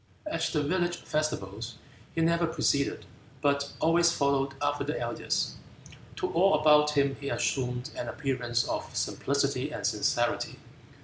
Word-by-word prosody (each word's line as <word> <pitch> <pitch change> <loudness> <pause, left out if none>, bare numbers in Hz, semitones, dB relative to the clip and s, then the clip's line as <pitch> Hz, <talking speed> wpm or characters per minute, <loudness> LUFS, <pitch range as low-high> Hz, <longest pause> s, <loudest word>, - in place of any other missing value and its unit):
At 310 - -2
the 150 -2 +1
village 175 +3 0
festivals 115 -7 -3 0.4
he 165 - +1
never 170 +1 +3
preceded, 145 -3 0 0.3
but 140 -1 +1
always 170 +1 +4
followed 140 -3 +1
after 145 0 0
the 150 +2 -2
elders. 120 0 -1 0.6
To - - -2
all 180 0 +5
about 150 -1 +5
him 140 -1 +2
he 140 - -3
assumed 125 +1 -1
an - - -4
appearance 125 -4 -1
of - - -4
simplicity 140 0 0
and - - -4
sincerity. 120 +1 0
140 Hz, 135 wpm, -29 LUFS, 130-155 Hz, 0.6 s, all